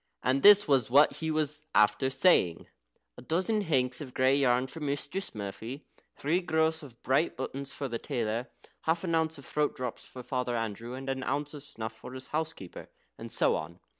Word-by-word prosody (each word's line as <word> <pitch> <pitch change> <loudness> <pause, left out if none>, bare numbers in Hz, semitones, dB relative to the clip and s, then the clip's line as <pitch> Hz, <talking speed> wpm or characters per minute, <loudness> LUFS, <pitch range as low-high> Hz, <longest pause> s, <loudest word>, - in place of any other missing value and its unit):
And 130 +2 +2
this 205 +3 +8
was 135 -6 +3
what 145 +4 +5
he 160 - -3
was 155 -1 -1
after 105 +5 +4
saying: 130 - +3 0.5
"A - - -10
dozen 185 - 0
hanks 130 -7 0
of 130 -4 -8
grey 130 +1 +4
yarn 130 -2 +3
for 130 +5 -8
Mistress 150 - -2
Murphy." 110 +7 -6 0.3
"Three 165 +6 +1
gross 160 -1 +1
of 130 -6 -13
bright 135 +5 +1
buttons 135 +1 -4
for 140 - -4
the 115 -2 -4
tailor." 120 -2 -2 0.4
"Half 165 +2 +1
an 170 -3 -1
ounce 160 -1 +1
of 140 - -12
throat 150 -1 0
drops 125 -2 -5
for 125 - -10
Father 125 -1 -2
Andrew, 115 +2 -4
and 135 +1 -8
an 135 0 -2
ounce 145 +3 -2
of 145 - -8
snuff 110 -6 -6
for 110 +3 -11
his 130 0 -7
housekeeper," 155 - -4 0.3
and - - -8
so - - +3
on. 85 +3 -6
135 Hz, 195 wpm, -29 LUFS, 125-155 Hz, 0.5 s, this